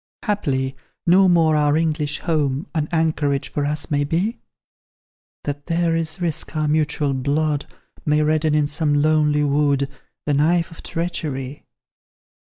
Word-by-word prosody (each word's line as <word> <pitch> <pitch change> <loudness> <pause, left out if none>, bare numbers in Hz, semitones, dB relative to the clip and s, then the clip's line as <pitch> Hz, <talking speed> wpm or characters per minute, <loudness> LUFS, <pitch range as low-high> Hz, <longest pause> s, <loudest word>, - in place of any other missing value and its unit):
Haply, 135 - -1 0.3
no 185 +2 +5
more 165 -3 +4
our 150 0 +3
English 155 -2 0
home 150 -3 0
An 155 -3 -1
anchorage 155 -4 0
for 145 -1 -1
us 150 0 -3
may 145 0 +2
be? 175 - -1 1.0
That 145 0 -5
there 170 -1 +1
is 165 +1 -2
risk 170 -2 -2
our 155 -1 +1
mutual 150 -2 +1
blood 145 +2 0 0.4
May 150 0 +2
redden 155 0 +2
in 150 -1 +3
some 150 0 0
lonely 150 0 +3
wood 140 -1 +2 0.4
The 150 - +1
knife 165 +4 +2
of 165 - -12
treachery? 145 -5 -4
150 Hz, 140 wpm, -21 LUFS, 145-165 Hz, 1.0 s, no